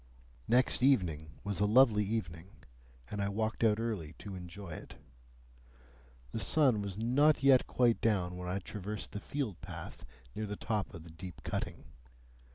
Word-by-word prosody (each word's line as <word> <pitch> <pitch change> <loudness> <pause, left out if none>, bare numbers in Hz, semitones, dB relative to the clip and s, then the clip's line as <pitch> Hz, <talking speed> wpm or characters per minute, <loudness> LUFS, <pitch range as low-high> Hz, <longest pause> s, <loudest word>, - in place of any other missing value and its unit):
Next 125 +1 +3
evening 85 - +2
was 100 -2 -2
a 105 - +3
lovely 110 -2 +6
evening, 95 -5 -3 0.6
and 105 - -2
I 100 - 0
walked 110 +3 -1
out 110 -1 +4
early 105 -10 -3
to 100 - -8
enjoy 90 0 -8
it. 75 - -8 1.4
The - - -3
sun 130 -9 +3
was 100 -1 -5
not 135 +7 +3
yet 135 -2 +6
quite 120 -2 +2
down 95 -5 +1
when 90 0 -5
I 90 - -1
traversed 105 +1 -5
the 105 - -4
field 125 - -4
path - - -8 0.3
near 110 - -3
the 105 - -4
top 105 -2 -2
of 80 - -9
the 85 - -12
deep 90 +2 -9
cutting. - - -3
105 Hz, 165 wpm, -33 LUFS, 90-115 Hz, 1.4 s, lovely